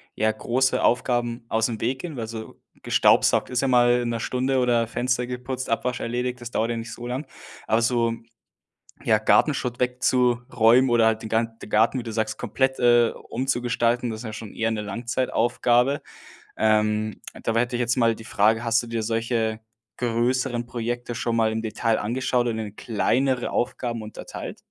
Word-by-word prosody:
ja, 110 +1 +2
große 130 +4 0
Aufgaben 120 -1 +1
aus 110 0 +1
dem 115 -3 -5
Weg 130 +3 -1
gehen, 170 -4 -6
weil 115 -2 -4
so 110 0 -8 0.2
gestaubsaugt - - +3
ist 125 -1 0
ja 135 - +1
mal 120 -1 +4
in 120 - -2
'ner 115 -1 -2
Stunde 130 +3 0
oder 120 -2 +2
Fenster 125 +1 -1
geputzt 125 +1 -5
Abwasch 120 +2 -1
erledigt, 125 +1 -3
das 120 0 -7
dauert 115 0 0
ja 115 - -2
nicht 115 0 -6
so 120 - -7
lang. 130 +5 -3 0.4
Aber 110 +1 +2
so, 115 -1 +1 0.9
ja, 110 - +4
Gartenschutt 120 +4 +2
wegzuräumen 125 -1 +3
oder 120 -1 +4
halt 110 0 +2
den 110 - -7
Ga 115 +1 +2
den 115 -1 -13
Garten, 110 +5 +3
wie - - -5
du 115 - -6
sagst, 110 -1 -1
komplett, 130 0 -1
äh, 120 -1 +5 0.2
umzugestalten, 120 -1 0
das 110 -1 -5
ist - - -8
ja 110 - -5
schon 110 -1 -8
eher 115 0 -1
'ne 110 -1 -2
Langzeitaufgabe. 120 +3 +1 0.6
Ähm, 110 -1 +1 0.2
dabei 115 0 +1
hätte 120 0 -1
ich - - -3
jetzt 120 +1 +1
mal 115 -2 +3
die 110 - -12
Frage: 110 +2 +2
„Hast 115 0 +2
du - - -9
dir 115 -1 -3
solche 115 0 -1 0.4
größeren 120 +1 0
Projekte 120 0 -4
schon 115 0 -1
mal 110 -1 +2
im 110 0 -2
Detail 115 0 0
angeschaut 125 +2 0
und 115 -1 -2
in 105 -2 -6
kleinere 125 +3 0
Aufgaben 120 -1 -2
unterteilt?“ 105 - -8
120 Hz, 180 wpm, -24 LUFS, 115-125 Hz, 0.9 s, äh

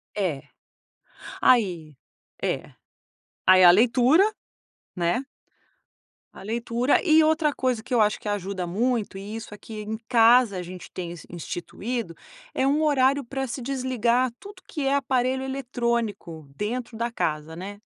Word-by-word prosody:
É. 175 -9 -2 1.0
Aí 175 - +2 0.5
é, - - -2 0.7
aí 185 0 +7
a 175 - +10
leitura, 245 - +5 0.7
né? 175 +7 0 1.1
A - - -12
leitura. 235 +4 0
E 320 -3 +5
outra 315 -1 +2
coisa 255 -5 -1
que 255 - -6
eu 240 - +4
acho 210 -1 +3
que - - -9
ajuda 195 -2 -3
muito, 215 +2 -1
e 200 +3 -7
isso 225 -2 -8
aqui 215 +1 -8
em 215 +1 -4
casa 235 -2 +5
a - - -3
gente 180 0 -10
tem 175 -2 -5
ins 175 - -10
instituído, 175 +4 -5 0.4
é 265 - +1
um 290 +3 +2
horário 280 -1 +3
pra 270 +2 -4
se 255 +2 -5
desligar 255 -1 0
tudo 395 -1 -13
que 315 -10 -3
é 275 - +2
aparelho 260 -1 0
eletrônico 235 - -3
dentro 230 - -4
da 235 +1 -2
casa, 155 -6 -2
né? 200 +4 -8
235 Hz, 145 wpm, -25 LUFS, 195-260 Hz, 1.1 s, a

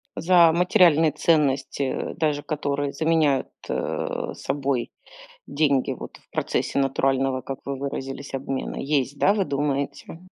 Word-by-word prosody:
За 170 -1 +5
материальные 170 -3 +4
ценности, 140 -3 +1
э, 130 - -3
даже 150 -3 0
которые 145 -2 -2
заменяют 155 -4 +2 0.9
собой 135 -4 -2 0.6
деньги, 140 -3 +1
вот, - - -8
в - - -30
процессе 140 - -1
натурального, 135 -1 +1
как 135 -1 -6
вы 140 0 -3
выразились, 135 0 -5
обмена. 135 0 -3
Есть, 140 -1 -1
да, 200 - +4
вы 200 -3 0
думаете? 140 +3 -3
140 Hz, 120 wpm, -24 LUFS, 135-155 Hz, 0.9 s, За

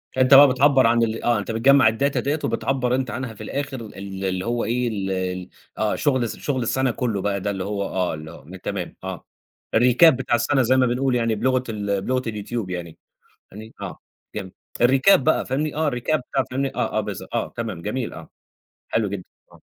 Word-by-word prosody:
فأنت 130 +1 +4
بقى 140 +1 +10
بتعبّر 135 -1 +4
عن 115 0 +3
ال 115 0 -2
آه، 120 -3 +2
أنت 100 - -4
بتجمّع 130 +1 +5
الData 140 +6 0
ديّة 145 +3 -1
وبتعبّر 130 -2 0
أنت 130 -2 -2
عنها 125 0 -5
في 105 - -10
الآخر 140 -3 -4
ال 95 -2 -7
اللي 95 +1 -2
هو 120 0 -1
إيه، 120 +2 0
ال 100 -4 -3
ال 90 -1 -3 0.3
آه 110 -1 0
شغل 130 -5 +1
الس 115 - -3
شغل 135 -3 -2
السنة 130 +2 +1
كُلّه 115 -5 -2
بقى 100 0 -1
ده 100 +1 -1
اللي 95 -2 -4
هو 100 0 -2
آه، 95 -2 -1
اللي 80 +1 -8
هو 75 - -13 0.2
تمام، 95 -4 -4
آه. 95 -3 -6 0.5
الRecap 125 +8 +6
بتاع 130 -3 0
السنة 135 +4 +2
زي 130 +2 +3
ما 130 - +4
بنقول 125 +1 0
يعني 115 -2 +1
بلُغة 130 +3 +1
ال 100 -3 -2
بلُغة 130 +4 0
اليوتيوب 105 -1 -4
يعني، 85 -3 -6 0.6
يعني 110 +3 -10
آه - - -6 0.4
جم 95 -3 -5 0.3
الRecap 130 +10 +6
بقى 130 - +1
فاهمني، 150 +3 -1
آه 155 -1 +1
الRecap 125 +6 0
بتاع 135 -1 +1
فاهمني، 135 +1 -2
آه، - - -1
آه، - - +3
بالض - - -6
آه - - -1
تمام، 110 -8 -4
جميل 120 +4 -3
آه، - - -10 0.6
حلو 110 -3 0
جدًا 95 -2 -5 0.3
آه. - - -18
115 Hz, 205 wpm, -23 LUFS, 100-130 Hz, 0.6 s, بقى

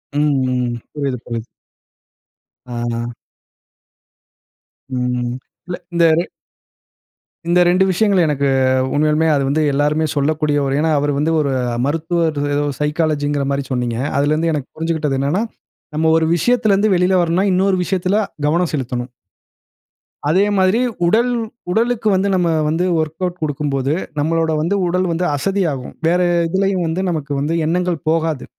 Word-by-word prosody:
ம். - - +2 0.3
ம். 125 -1 -1 0.2
புரியுது 140 -4 -2
புரியுது. 115 -1 -5 1.3
ஆஹ. 120 0 -2 1.9
ம் 125 -1 -1 0.4
இல்ல 180 - -4 0.2
இந்த 170 0 +3 1.4
இந்த 175 +1 +3
ரெண்டு 180 +2 +4
விஷயங்கள் 190 -1 +3
எனக்கு 140 -2 0 0.5
உண்மையாலுமே, 155 +2 +2
அது 140 - +1
வந்து 155 +2 +1
எல்லாருமே 150 +2 +1
சொல்லக்கூடியவர். 145 -1 +1
ஏன்னா, 160 +1 +1
அவர் 145 0 0
வந்து 150 +3 +1
ஒரு 140 -2 -1 0.3
மருத்துவர், 165 +1 0 0.2
ஏதோ 145 - +1 0.2
சைக்காலஜின்கிற 150 -2 0
மாதிரி 140 0 -1
சொன்னீங்க. 120 -2 -1 0.2
அதுலருந்து 155 +4 +1
எனக்கு 145 -3 -3
புரிஞ்சுகிட்டது 160 -4 -1
என்னன்னா, 150 +10 0 0.5
நம்ம 160 +1 +2
ஒரு 160 - +2
விஷயத்துல 225 +1 +2
இருந்து 205 +1 +2
வெளியில் 180 +1 +3
வரனுன்னா, 175 +4 +1
இன்னொரு 190 +1 +2
விஷயத்துல 185 +1 0 0.3
கவனம் 170 +2 +1
செலுத்தனும். 125 -2 -3 1.2
அதே 190 +6 +4
மாதிரி 190 +4 +3 0.3
உடல், 235 +7 +3 0.4
உடலுக்கு 230 +2 0
வந்து 190 +1 +1
நம்ம 175 -2 +1 0.2
வந்து 165 +4 0
வொர்க்கவுட் 165 +3 -2
கொடுக்கும்போது, 145 -2 -1 0.3
நம்மளோட 160 +2 +1
வந்து 175 +6 0
உடல் 180 +2 0
வந்து 170 +2 -1
அசதியாகும். 165 -6 -1
வேற 175 +2 +3 0.3
எதிலேயும் 190 0 0
வந்து 165 +3 -1
நமக்கு 150 -4 -3
வந்து 150 +4 -1
எண்ணங்கள் 175 -1 -1
போகாது. 160 -4 0
160 Hz, 130 wpm, -18 LUFS, 145-180 Hz, 1.9 s, ரெண்டு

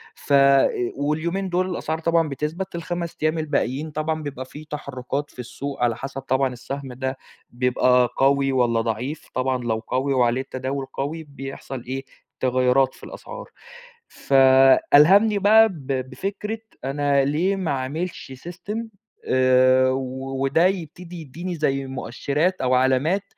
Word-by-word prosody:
ف 145 - -3
أ 140 -1 +6 0.3
واليومين 165 +7 -1
دول 185 +1 0
الأسعار 160 -2 -3
طبعًا 165 -1 +1
بتثبت، 160 +7 -4
ال5 170 0 -4
أيام 155 +1 +2
الباقيين 150 -1 -1
طبعًا 155 +1 -2
بيبقى 130 -2 -6
في 150 +4 -11
تحرُّكات 145 -1 -5
في - - -18
السوق 125 +2 -5
على 115 -2 +2
حسب 135 0 -6
طبعًا 130 -1 0
السهم 135 +1 -7
ده 130 +1 -3 0.3
بيبقى 125 0 +2
قوي 135 0 +3
والّا 120 -3 +2
ضعيف. 120 +7 -4
طبعًا 130 -1 -1
لو 115 -2 0
قوي 135 +2 0
وعليه 125 0 +2
التداول 135 +1 -4
قوي 155 +4 -4
بيحصل 135 -3 -8
إيه، 135 +1 -5 0.3
تغيُّرات 130 +1 +2
في - - -19
الأسعار. - - -9 0.6
فألهمني 145 +10 +5
بقى 220 +2 +6
ب 150 -7 -10 0.2
بفكرة 210 +3 -4 0.3
أنا 140 0 +1
ليه 170 +8 +1
ما 185 -5 -2
أعملش 140 +2 -4 0.2
system 180 +4 -6 0.5
آآ 130 0 +4
و 130 +1 -3
وده 155 +6 +3
يبتدي 175 -1 -3
يدّيني 170 +5 -6
زي 135 -3 0
مؤشرات 140 +7 -2
أو 130 0 +1
علامات، 130 +10 +2
140 Hz, 140 wpm, -23 LUFS, 130-160 Hz, 0.6 s, أ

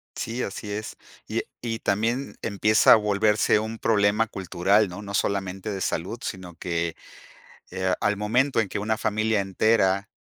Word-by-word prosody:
Sí, 120 +2 -3
así 105 +1 -5
es. 110 +1 -5 0.3
Y, - - -1
eh, - - -6
y 115 -2 -3
también 115 +7 -1
empieza 105 0 +5
a - - +9
volverse 105 0 +2
un 110 +1 -5
problema 105 0 +2
cultural, 95 +2 +1
¿no?, 90 +3 -8
no 100 -1 -8
solamente 95 +1 -1
de 95 -1 -4
salud, 95 +8 -2
sino 90 -2 -6
que, 85 -1 -2 0.8
eh, 95 0 -3
ah, 90 - +2
al 105 0 +1
momento 120 +5 +1
en 100 - -3
que - - -3
una 110 +1 -1
familia 110 0 0
entera 100 0 +1
105 Hz, 170 wpm, -25 LUFS, 95-110 Hz, 0.8 s, a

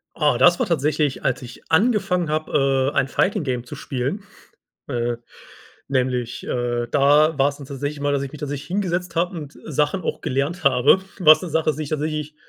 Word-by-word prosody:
Ah, 150 -2 +2
das 175 -1 +5
war - - +2
tatsächlich, 150 -3 0
als - - 0
ich 125 0 -12
angefangen 185 -4 +2
habe, 135 -3 +1
äh, - - -4
ein 135 - +3
Fighting-Game 135 - 0
zu 145 - -8
spielen, 135 +8 -3 0.7
äh, 120 -2 -1 0.7
nämlich, 125 -3 -1
äh 120 -1 -1
da 145 +2 +4
war's 140 +1 +2
dann 140 - -10
tatsächlich 145 +2 -4
immer, 145 0 0
dass 140 -1 0
ich 140 +1 -6
mich 150 - -10
tatsächlich 145 0 -5
hingesetzt 180 -2 -2
habe 175 +1 0
und, 150 -3 -8
äh, - - -11
Sachen 150 +5 0
auch - - -3
gelernt 140 +7 -2
habe. 140 +6 +5 0.2
Was 155 -2 +7
'ne 180 - -4
Sache 160 0 +1
ist, 150 - -5
die 155 - -2
ich - - -8
tatsächlich 150 0 -3
145 Hz, 190 wpm, -22 LUFS, 135-160 Hz, 0.7 s, Was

